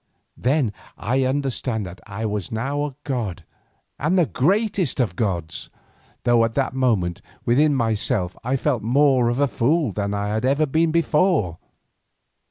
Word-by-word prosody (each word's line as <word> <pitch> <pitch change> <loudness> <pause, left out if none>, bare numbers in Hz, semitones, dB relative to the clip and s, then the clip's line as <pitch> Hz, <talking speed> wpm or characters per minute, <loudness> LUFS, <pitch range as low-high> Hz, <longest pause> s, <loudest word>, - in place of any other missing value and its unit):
Then 130 -3 +1 0.2
I 130 +5 0
understood 130 -4 -1
that 90 -1 -8
I 105 +2 -4
was 105 -4 -3
now 135 +6 -1
a 140 -3 -6
god 120 -10 -3 0.6
and 160 +6 +1
the 175 - +5
greatest 190 - +1
of 105 -9 0
gods, 85 -6 -3 0.5
though 120 -1 +4
at 115 0 -1
that 135 -2 0
moment 110 -10 0 0.2
within 145 +5 +3
myself 110 -5 0
I 125 +3 0
felt 135 -3 0
more 130 +1 +3
of 120 +2 -1
a 145 - +3
fool 140 +2 +1
than 100 +1 -2
I 100 0 -2
had 110 +2 -1
ever 140 +4 +3
been 160 +3 +2
before. 155 - +2
125 Hz, 155 wpm, -22 LUFS, 105-145 Hz, 0.6 s, the